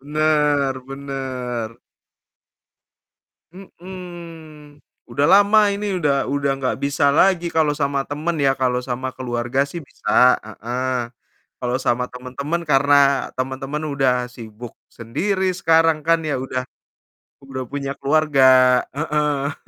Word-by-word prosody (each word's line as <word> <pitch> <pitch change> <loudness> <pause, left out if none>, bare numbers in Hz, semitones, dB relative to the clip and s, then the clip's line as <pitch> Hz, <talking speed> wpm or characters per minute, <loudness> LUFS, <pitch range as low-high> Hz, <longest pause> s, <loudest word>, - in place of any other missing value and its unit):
Benar 150 -2 +1
benar. 130 -4 -5 1.8
Mhm, 170 -5 -12 0.2
udah 130 +4 0
lama 205 +2 +6
ini 200 -1 -2
udah 140 -5 0
udah 140 0 0
gak 130 - -1
bisa 140 +1 0
lagi 175 -1 +3
kalau 160 -3 +1
sama 140 -2 -1
teman 155 +4 -3
ya. 135 - +4
Kalau 125 -1 +1
sama 130 +1 -4
keluarga 120 0 -3
sih 155 +5 -7
bisa, 125 -3 +3
heeh. 120 +3 -3 0.5
Kalau 125 0 -1
sama 125 0 0
teman-teman 130 +6 -4
karena 140 0 +4 0.4
teman-teman 135 +3 -3
udah 135 -2 +2 0.2
sibuk 115 0 -10 0.2
sendiri 185 - -2 0.2
sekarang 165 -1 +4
kan 165 0 +4
ya 145 - 0
udah 130 -1 -3 0.8
udah 130 -1 -5
punya 140 -1 -3
keluarga, 130 -4 +4 0.2
heeh. 150 -2 -1
140 Hz, 115 wpm, -21 LUFS, 130-155 Hz, 1.8 s, lama